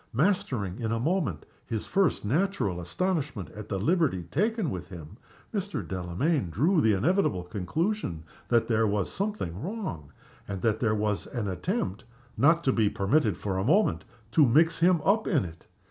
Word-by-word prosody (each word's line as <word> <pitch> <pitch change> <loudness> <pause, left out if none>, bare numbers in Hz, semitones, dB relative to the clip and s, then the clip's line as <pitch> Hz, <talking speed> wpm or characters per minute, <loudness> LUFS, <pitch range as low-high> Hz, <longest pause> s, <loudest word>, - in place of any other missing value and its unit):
Mastering 125 - 0
in 115 -2 -2
a 115 - 0
moment 145 - -1 0.2
his 110 -2 -3
first 195 - +1
natural 125 - 0
astonishment 135 - -2
at 105 0 -9
the 100 - -1
liberty 130 - +1
taken 200 - 0
with 90 -1 -6
him, 85 -1 -10 0.4
Mr. 200 -2 -3
Delamayn 95 - -1
drew 155 - +2
the 110 -4 +4
inevitable 110 - +1
conclusion 105 - -2 0.2
that 120 -1 +2
there 115 -1 +2
was 100 -2 -1
something 195 - -3
wrong, 155 - -5 0.4
and 95 -2 -5
that 110 -2 +2
there 110 -2 +1
was 105 -1 -1
an 115 -5 -3
attempt 105 - -2 0.3
(not 165 +4 +4
to 130 - +2
be 110 -3 +3
permitted 105 +3 +1
for 95 -2 -2
a - - 0
moment) 130 - +2 0.3
to 145 +3 +5
mix 160 +6 +4
him 175 -1 +4
up 215 +3 +3
in 150 - +2
it. 85 -1 -11
115 Hz, 165 wpm, -28 LUFS, -, 0.4 s, to